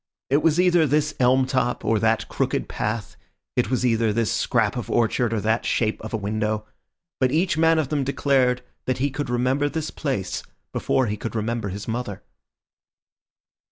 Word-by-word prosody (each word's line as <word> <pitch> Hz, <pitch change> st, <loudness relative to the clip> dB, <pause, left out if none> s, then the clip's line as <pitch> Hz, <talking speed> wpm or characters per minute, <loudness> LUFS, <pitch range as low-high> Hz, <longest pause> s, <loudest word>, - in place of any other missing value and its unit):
It 145 Hz, +2 st, +4 dB
was 165 Hz, +1 st, +3 dB
either 175 Hz, -3 st, +4 dB
this 150 Hz, +2 st, +1 dB
elm 130 Hz, +1 st, +4 dB
top 130 Hz, -2 st, -1 dB
or 110 Hz, -1 st, +2 dB
that 110 Hz, +1 st, +1 dB
crooked -, -, -1 dB
path, 105 Hz, 0 st, -3 dB, 0.4 s
it 125 Hz, -, +1 dB
was 125 Hz, 0 st, 0 dB
either 115 Hz, -2 st, +2 dB
this 115 Hz, 0 st, 0 dB
scrap -, -, +1 dB
of -, -, -4 dB
orchard 120 Hz, 0 st, +1 dB
or 115 Hz, -, 0 dB
that 110 Hz, +2 st, +1 dB
shape 110 Hz, -2 st, 0 dB
of 110 Hz, -, -7 dB
a 115 Hz, -, -1 dB
window; 110 Hz, +1 st, -2 dB, 0.5 s
but 130 Hz, -1 st, +2 dB
each 165 Hz, +3 st, +2 dB
man 160 Hz, 0 st, +4 dB
of 155 Hz, -4 st, 0 dB
them 145 Hz, -2 st, 0 dB
declared 130 Hz, -2 st, +1 dB, 0.2 s
that 130 Hz, -, +1 dB
he 140 Hz, +2 st, 0 dB
could 145 Hz, -1 st, -4 dB
remember 130 Hz, +4 st, +1 dB
this 160 Hz, 0 st, -3 dB
place 115 Hz, -, -2 dB, 0.3 s
before 130 Hz, -, +1 dB
he 105 Hz, -1 st, -2 dB
could 115 Hz, +3 st, -5 dB
remember 115 Hz, -1 st, -2 dB
his 100 Hz, +2 st, -6 dB
mother. 115 Hz, -4 st, -4 dB
125 Hz, 180 wpm, -24 LUFS, 110-140 Hz, 0.5 s, It